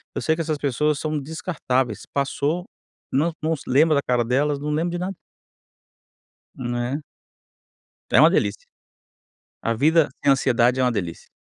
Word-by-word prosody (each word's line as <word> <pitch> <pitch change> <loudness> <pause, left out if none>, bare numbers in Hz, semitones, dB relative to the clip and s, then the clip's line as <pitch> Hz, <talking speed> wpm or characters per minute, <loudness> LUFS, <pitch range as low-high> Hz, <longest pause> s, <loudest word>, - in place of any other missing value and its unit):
eu - - -2
sei 160 - +2
que 165 - -3
essas 155 -2 -1
pessoas 145 +1 0
são 155 0 -2
descartáveis. 140 - -2
Passou, 145 +5 -1 0.5
não 155 +6 +2
não 160 +1 0
se 145 - -11
lembra 150 +4 +4
da 140 - +2
cara 125 -1 +1
delas, 140 +4 +1
não 150 - -4
lembro 160 +3 0
de 175 - -3
nada. 185 +2 -3 1.4
Né. 120 +4 -3 1.1
É - - +6
uma - - +8
delícia. - - 0 1.0
A 115 - 0
vida 155 +5 +4
sem - - +4
ansiedade 125 -1 +2
é - - +3
uma 125 -1 +2
delícia. 90 -6 -5
145 Hz, 160 wpm, -23 LUFS, 125-160 Hz, 1.4 s, uma